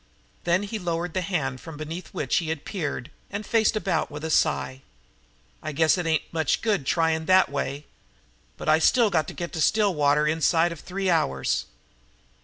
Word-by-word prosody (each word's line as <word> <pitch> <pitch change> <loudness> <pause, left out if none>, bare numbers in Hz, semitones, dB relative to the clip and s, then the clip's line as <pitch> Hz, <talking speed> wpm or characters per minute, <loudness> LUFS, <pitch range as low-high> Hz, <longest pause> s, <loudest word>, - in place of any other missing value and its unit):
Then 175 +3 +2
he 215 +2 -4
lowered 170 -1 -2
the 185 - 0
hand 145 -8 -2
from 160 -2 -9
beneath 160 +4 -6
which 135 - -1
he 165 -2 -1
had 160 -2 -4
peered 150 - -4 0.2
and 205 +2 -5
faced 225 -1 +2
about 190 -7 0
with 150 +1 -8
a 160 - -2
sigh. 130 -3 +1 0.8
"I 155 - -5
guess 160 +2 +4
it 175 -3 -2
ain't 160 -2 +1
much 160 -3 0
good 200 - 0
trying 160 -1 +1
that 185 0 +5
way. 140 +1 -3 0.7
But - - -7
I 155 +1 +5 0.3
got 160 -4 +1
to - - -6
get 170 -1 -5
to 160 - -2
Stillwater 150 -8 +3
inside 165 +2 +2
of 170 - -7
three 190 +2 -2
hours." 65 - 0
160 Hz, 180 wpm, -25 LUFS, 150-180 Hz, 0.8 s, that